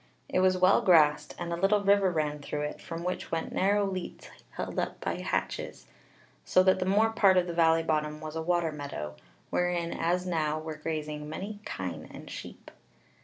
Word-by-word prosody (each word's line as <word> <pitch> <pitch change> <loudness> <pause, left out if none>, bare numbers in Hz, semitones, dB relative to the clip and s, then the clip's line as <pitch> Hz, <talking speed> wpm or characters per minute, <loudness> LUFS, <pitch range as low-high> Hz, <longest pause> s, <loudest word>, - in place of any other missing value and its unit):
It - - 0
was 185 0 +4
well 185 +1 +5
grassed, 155 -5 +4
and 170 -1 -4
a - - 0
little 195 +4 +2
river 200 -1 +4
ran 150 -3 -1
through 145 +1 -4
it, 150 0 -4
from 170 -2 -6
which 180 +1 -3
went 165 -1 -2
narrow 200 +2 +2
leats 185 -2 -6 0.3
held - - -3
up - - -3
by - - -3
hatches, - - -3 0.6
so 185 - +4
that 185 0 +4
the 185 - -1
more 215 +4 +3
part 195 -4 +4
of 180 - +4
the 175 - -4
valley 165 -1 +4
bottom 150 -1 -1
was 155 0 -7
a 160 - -2
water 170 -1 +1
meadow, 140 - -6 0.4
wherein 175 -1 0
as 180 +2 0
now 155 -4 0
were 155 0 -5
grazing 150 -1 -4
many 200 +6 -6
kine 85 -5 -5
and - - -10
sheep. - - -9
170 Hz, 190 wpm, -29 LUFS, 155-185 Hz, 0.6 s, well